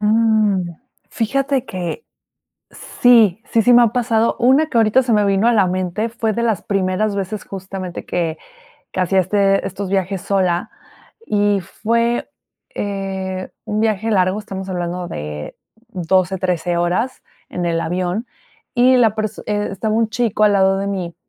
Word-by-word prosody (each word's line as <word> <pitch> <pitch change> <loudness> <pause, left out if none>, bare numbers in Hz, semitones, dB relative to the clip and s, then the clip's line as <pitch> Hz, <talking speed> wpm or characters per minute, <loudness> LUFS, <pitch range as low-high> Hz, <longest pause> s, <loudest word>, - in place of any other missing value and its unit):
Mm. 215 -4 +2 0.4
Fíjate 270 +3 0
que 185 - -5 0.7
sí, 225 -5 +3
sí, 230 - +4
sí 245 +2 +5
me 240 0 +7
ha 235 - +5
pasado. 230 -1 +1
Una 265 +6 +4
que 255 - -1
ahorita 225 +3 +4
se 240 -2 +1
me 210 -1 +3
vino 200 +3 +2
a 240 - +4
la 200 -4 +3
mente 185 +4 -2
fue 225 -1 -2
de 235 - -1
las 225 -5 0
primeras 200 +1 0
veces 195 +1 -4
justamente 190 -2 -7
que 165 -2 -2 0.6
que - - -2
hacía 190 +1 +3
este 195 +1 +1
estos 195 0 -5
viajes 190 -1 -1
sola. 185 -3 0 0.6
Y 205 -1 +2
fue, 230 +6 -1 0.4
eh, 190 -2 -4
un 215 -1 -2
viaje 220 0 0
largo, 185 -1 +2
estamos 195 -2 -7
hablando 175 -1 -3
de 75 - -6 0.3
12, 185 -1 0
13 175 -2 -1
horas 180 +9 -1 0.3
en 180 - -4
el 165 -1 0
avión, 180 +6 -2 0.5
y 255 +1 +5
la 225 -4 +4
perso 215 -1 -4
eh, 205 0 -1
estaba 215 +2 -2
un 225 0 +2
chico 225 -2 +1
al 210 - +5
lado 195 0 +3
de 195 - -2
mí, 185 -4 -3
200 Hz, 160 wpm, -19 LUFS, 185-225 Hz, 0.7 s, me